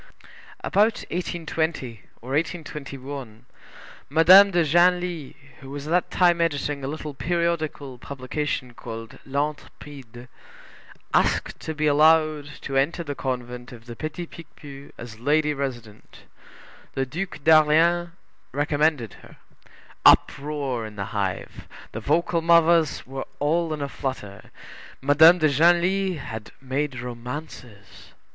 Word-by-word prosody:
About 210 +3 +2
1820 160 - -3 0.2
or 125 - -8
1821, 140 -6 -5 0.6
Madame 180 +7 +8
de 175 -3 +2
Genlis, 175 -1 +1 0.2
who 135 - -12
was 145 +1 -7
at 155 - -5
that 180 +1 +1
time 175 -2 +3
editing 145 -3 -1
a - - -3
little 150 0 -5
periodical 160 -5 -2
publication 135 -1 -4
called 115 -1 -9
l'Intrépide, 140 -3 -5 0.9
asked - - +1
to 160 - -5
be 155 +1 -1
allowed 155 0 +4
to 135 - -5
enter 145 +6 +1
the 145 -3 -4
convent 125 -2 -5
of 115 -2 -13
the 120 -1 -9
Petit 155 +6 -5
Picpus 145 -4 -12
as 115 -2 -10
lady 150 +4 +2
resident. 120 -7 -7 0.7
The 135 - 0
Duc 175 +8 -5
d'Orléans 160 +3 +4 0.4
recommended 145 -4 0
her. - - -16 0.7
Uproar 140 -4 +3
in 105 - -12
the 100 -1 -4
hive; 100 -3 -4 0.2
the - - -5
vocal 170 0 +1
mothers 170 -1 +3
were 135 +1 -6
all 160 +3 0
in 150 -2 -3
a - - -2
flutter; 115 -8 -6 0.5
Madame 160 +5 +6
de 155 -3 +3
Genlis 175 +5 +2
had 110 -6 -8
made 135 -1 -3
romances. 120 -4 -9
145 Hz, 120 wpm, -24 LUFS, 130-165 Hz, 0.9 s, Madame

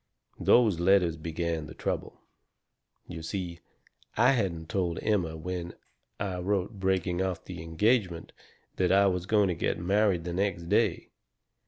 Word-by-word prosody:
"Those 110 -8 +4
letters 90 -2 +3
began 80 0 -3
the - - -11
trouble. - - -4 0.9
You 85 -2 -7
see, 85 0 -4 0.6
I 120 +4 +6
hadn't 90 -10 -1
told 90 -2 -1
Emma 90 -7 0
when 85 +1 -5 0.4
I 95 -2 -3
wrote 100 +2 -1
breaking 95 -1 0
off 95 -2 -2
the 90 -3 -7
engagement 90 +1 0 0.4
that 90 -1 +2
I 100 +1 +5
was 90 -2 0
going 105 -2 +3
to - - +1
get 85 - -1
married 95 0 +2
the 85 0 -4
next 90 -3 -1
day. 105 -3 +1
90 Hz, 145 wpm, -29 LUFS, 85-100 Hz, 0.9 s, I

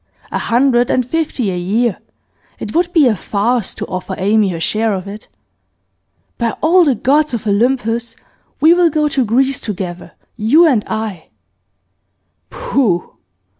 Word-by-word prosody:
A - - -2
hundred 245 0 +2
and 255 - +1
fifty 265 -7 -2
a - - -3
year; 205 +5 -1 0.6
it - - -7
would 345 +1 +1
be 325 -5 +4
a 235 -4 +3
farce 210 +4 -1
to - - -5
offer 185 +1 -5
Amy 205 +1 +2
her 170 -2 -4
share 215 +5 0
of 185 +1 -6
it. 205 +2 -9 1.1
By 235 -2 -1
all 350 +3 +4
the 285 -6 +2
gods 290 +3 +1
of 230 - -6
Olympus, 230 +1 0 0.4
we 320 +3 +6
will 350 -1 +3
go 300 0 +1
to 275 -3 0
Greece 260 +4 +1
together, 180 -4 -6 0.2
you 245 +10 +4
and 250 -10 +2
I!' 215 -7 -5 1.2
'Pooh! 205 - -1
235 Hz, 150 wpm, -16 LUFS, 205-275 Hz, 1.2 s, we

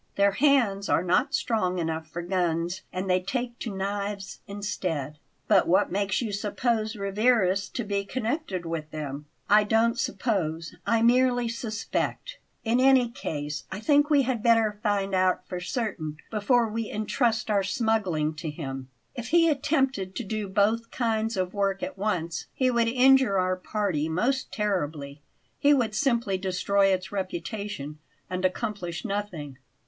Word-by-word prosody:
Their 200 0 +4
hands 220 -5 +2
are - - +3
not 180 0 +2
strong 185 -6 0
enough 160 -1 -2
for 170 +2 -6
guns, 175 -1 -1
and 185 +1 -3
they 185 0 +3
take 240 +5 -4
to 220 -5 -4
knives 200 0 -3
instead." 180 -8 -3 0.3
"But - - +4
what 180 - +3
makes 200 +4 0
you 220 - -3
suppose 215 +2 -1
Rivarez 200 -1 +2
to 240 - -3
be 200 -1 -1
connected 230 - -3
with 165 -2 -4
them?" 150 -1 -6 0.2
"I 210 +1 +6
don't 225 +3 +2
suppose, 170 -11 -1
I 230 0 +3
merely 245 0 +4
suspect. 230 - -3 0.2
In 235 +2 +2
any 260 -2 +5
case, 150 -9 -5
I 190 - -4
think 290 +5 +3
we 285 -3 +5
had 250 -3 -1
better 225 -2 +3
find 200 -2 0
out 185 0 +2
for 180 - -4
certain 175 -5 -3
before 230 +2 +2
we 225 0 -3
intrust 220 +1 0
our 200 -1 +3
smuggling 190 -7 0
to 160 0 -4
him. 135 -4 -6 0.2
If 240 -3 -6
he 330 +3 +4
attempted 270 - 0
to - - -3
do 210 0 -3
both 215 +4 +1
kinds 225 -2 -1
of 185 -1 -1
work 195 -1 0
at - - -4
once 180 -5 -2
he 255 -1 +2
would 235 -1 +2
injure 255 -3 +5
our 185 0 +1
party 185 -5 -1
most 245 +11 0
terribly; 150 -9 -2 0.4
he 290 +1 +5
would 230 -5 0
simply 235 -6 +1
destroy 195 +1 +2
its 190 -1 0
reputation 185 -5 -4 0.3
and 185 0 -2
accomplish 185 -2 -2
nothing. 180 - -4
200 Hz, 155 wpm, -27 LUFS, 180-230 Hz, 0.4 s, I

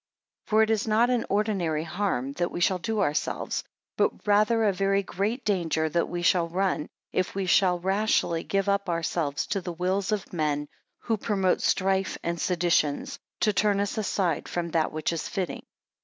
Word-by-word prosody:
8 - - -23
For 220 +1 +4
it 220 - +1
is 220 0 0
not 225 +3 +3
an 245 -2 0
ordinary 195 -7 0
harm 170 -6 -2
that 175 +3 -1
we - - -5
shall 180 +1 +2
do 215 +3 -1
ourselves, 150 -6 -1 0.3
but - - 0
rather 215 +2 +3
a 205 -2 +3
very 195 +1 +1
great 210 +7 -2
danger 170 -6 +1
that 170 +2 0
we 175 0 -3
shall 175 -1 +3
run, 185 -3 0 0.3
if 185 +1 -1
we 195 -1 -1
shall 180 0 +4
rashly 190 -2 +1
give 195 0 -1
up 200 -1 +1
ourselves 165 -3 -1
to 195 - -2
the 175 -1 -5
wills 185 +4 -1
of 210 -3 -3
men, 150 -3 -1 0.3
who 225 -2 0
promote 195 -3 +1
strife 190 0 +1
and 170 0 -2
seditions, 175 - +1 0.2
to 210 - +3
turn 205 0 +2
us 200 0 -1
aside 195 -6 -1
from 170 -1 -3
that 160 -1 +1
which 155 +2 -2
is 165 - -3
fitting. 185 -3 -3
190 Hz, 185 wpm, -27 LUFS, 170-205 Hz, 0.3 s, For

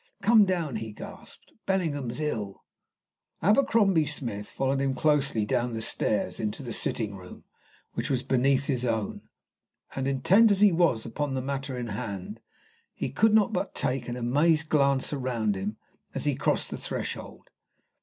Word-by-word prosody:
"Come 220 -2 +6
down!" 170 - -1
he 110 -1 -6
gasped. - - -11
"Bellingham's 150 -10 -1
ill." 110 -10 -3 0.8
Abercrombie 205 - +4
Smith 115 -8 -4
followed 135 0 -1
him 135 -1 0
closely 140 -6 +2
down 120 +1 -1
stairs 105 -4 0
into 110 +5 -3
the 120 -3 -5
sitting 105 -1 -1
room 90 -2 -12 0.5
which - - -3
was 130 -2 0
beneath 135 +1 +2
his 130 -4 -1
own, 110 -4 -2 0.7
and 135 0 -2
intent 180 - +5
as 200 -1 +2
he 210 -2 +7
was 165 -10 +2
upon 145 -2 -3
the - - 0
matter 135 -1 -3
in 120 -2 -4
hand, 105 - -5 0.6
he - - -3
could 220 -1 +3
not 215 0 +3
but 200 - -2
take 125 -1 -1
an 120 - -3
amazed 150 +6 +2
glance 140 -2 +2
around 125 -6 -1
him 100 +3 -4 0.4
as - - -2
he - - +2
crossed - - 0
the - - -5
threshold. - - -6
135 Hz, 155 wpm, -27 LUFS, 115-160 Hz, 0.8 s, he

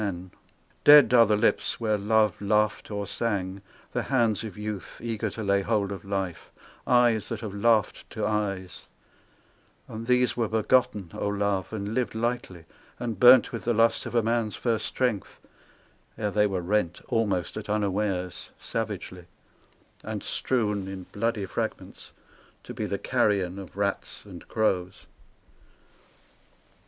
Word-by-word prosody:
POETS 105 - 0
MILITANT 90 +1 -12 0.5
271 145 -1 +9
Dead - - -2
are 115 -2 +8
the 105 - +3
lips 105 - +1
where 110 -2 +1
love 105 0 +2
laughed 105 -3 +1
or 100 -1 -3
sang, 100 -2 -2 0.3
The - - 0
hands 115 -6 +1
of 110 -2 -7
youth 105 -4 -6
eager 115 -2 -3
to 110 +3 -6
lay 100 0 +2
hold 100 -1 0
of 95 -3 -6
life, 95 -3 -4 0.4
Eyes 120 -3 +3
that 115 -3 -4
have 110 -4 -5
laughed 110 0 +1
to - - -3
eyes, 100 -4 -3 1.0
And 115 +1 -7
these 125 0 +3
were 115 -2 0
begotten, 110 -4 +1
O - - -3
Love, 100 -2 -1
and 105 -1 -4
lived 125 -2 -1
lightly, 115 -7 -3 0.3
and 115 -5 -4
burnt 125 +1 +7
With - - -5
the 120 -1 +1
lust 115 +1 +2
of - - -6
a 115 - +3
man's 115 -1 0
first 115 -3 -1
strength: 120 -7 -2 0.8
ere 105 -2 -1
they 105 +1 +3
were 95 -3 -2
rent, 90 -1 0
Almost 100 -6 0
at 110 -1 -7
unawares, 100 -3 -1
savagely; 100 -5 -5 0.8
and - - -5
strewn 105 -6 -1
In 95 -1 -6
bloody 110 -1 -1
fragments, - - -5 0.5
to - - -8
be - - -3
the - - -2
carrion 95 -2 0
Of 95 0 -11
rats 100 0 -2
and 90 -4 -11
crows. 95 -3 -1
105 Hz, 150 wpm, -27 LUFS, 95-115 Hz, 1.0 s, 271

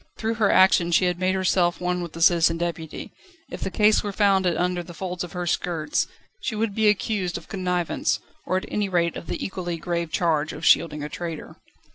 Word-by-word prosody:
Through 225 0 -1
her 205 - +4
action 180 -2 +5
she 180 +2 +4
had 180 -1 0
made 185 +1 +1
herself 180 -2 +1
one 180 0 -1
with 170 -2 -6
the 165 - -1
Citizen 165 -1 +4
Deputy; 165 -2 -5 0.4
if - - -7
the - - -2
case 210 +2 +4
were 205 - -4
found 195 -2 +3
under 180 +1 0
the 175 0 -11
folds 180 -1 -4
of 180 - -8
her 180 -1 -3
skirts, 165 -3 -1 0.3
she 240 - -3
would 215 -1 -1
be 220 +1 +2
accused 200 -3 -1
of - - -12
connivance, 180 -3 -1 0.3
or 185 - +1
at 185 - -3
any 205 -2 -1
rate 170 -2 +1
of - - -8
the - - -3
equally 175 -3 -4
grave 170 0 -3
charge 155 -3 0
of 160 - -6
shielding 150 -3 +3
a - - -3
traitor. 165 -1 -6
180 Hz, 210 wpm, -24 LUFS, 170-190 Hz, 0.4 s, action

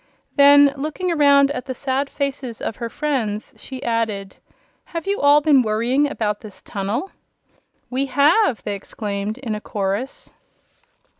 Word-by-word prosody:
Then, 285 0 +7
looking 310 +6 -2
around 280 -3 +5
at 270 -2 -5
the 260 - -4
sad 275 +2 -1
faces 275 -5 -4
of 220 - -4
her 235 - -4
friends, 230 -8 -2
she 260 -1 -9
added: 220 -4 -2 0.5
"Have 335 0 -6
you 400 +1 -1
all 290 +1 +6
been 290 -3 +5
worrying 240 +6 +1
about 210 -6 -2
this 210 -3 -11
tunnel?" 205 - -3 0.8
"We 270 +2 -1
have!" 285 - +3
they 205 - -3
exclaimed 200 +1 -4
in 250 -4 -4
a 210 - -4
chorus. 205 +6 -4
260 Hz, 145 wpm, -21 LUFS, 215-285 Hz, 0.8 s, Then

